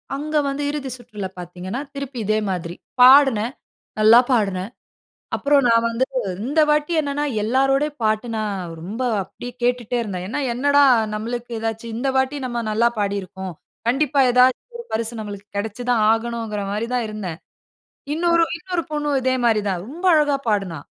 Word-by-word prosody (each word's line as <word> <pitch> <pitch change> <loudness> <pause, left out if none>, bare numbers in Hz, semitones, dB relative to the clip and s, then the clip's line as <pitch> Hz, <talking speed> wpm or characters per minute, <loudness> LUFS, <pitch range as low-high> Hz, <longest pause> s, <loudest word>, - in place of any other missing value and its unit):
அங்க 305 +2 -4
வந்து 275 +1 -2
இறுதி 285 -3 -4
சுற்றுல 210 -5 -7
பார்த்தீங்கன்னா, 180 +6 -6
திருப்பி 275 -2 -6
இதே 215 +1 +2
மாதிரி, 175 -1 -3 0.3
பாடுனேன், 255 -3 +6 0.5
நல்லா 220 +3 +8
பாடுனேன். 200 -4 0 0.7
அப்புறம், 280 -1 +3
நான் 230 0 +4
வந்து 230 +3 0 0.4
இந்த 300 +4 +2
வாட்டி 300 +3 +2
என்னன்னா 290 0 -2 0.2
எல்லாரோடை 270 +5 +2
பாட்டும், 215 +2 0
நான் 195 -6 -3
ரொம்ப 210 +8 -6 0.2
அப்படியே 245 +6 -9
கேட்டுட்டே 245 -1 0
இருந்தேன். 185 -5 -4
ஏன்னா, 260 +7 -3
என்னடா 285 +3 +4 0.3
நம்மளுக்கு 240 +2 -5
ஏதாச்சு 225 +1 -3
இந்த 265 +3 -1
வாட்டி 265 +2 +1
நம்ம 240 -1 -2
நல்லா 235 +2 +3
பாடிருக்கோம். 190 -2 -3 0.3
கண்டிப்பா 280 +2 +2
ஏதாச்சு 250 +1 +4 0.2
ஒரு 475 - -7
பரிசு 230 +1 -1
நம்மளுக்கு 205 -1 -7
கிடைச்சி 220 +3 -4
தான் 225 -3 +3
ஆகணுங்கிற 225 -2 -2
மாதிரி 215 +3 -2
தான் 245 -2 0
இருந்தேன். 195 -6 -5 0.8
இன்னொரு 340 0 +3
இன்னொரு 355 -1 -3
பொண்ணும் 295 -2 0
இதே 260 0 +1
மாதிரி 220 -2 +3
தான் 180 -3 -1
ரொம்ப 335 +8 -9
அழகா 295 -2 +3
பாடுனா. 195 -7 0
235 Hz, 150 wpm, -21 LUFS, 210-275 Hz, 0.8 s, நல்லா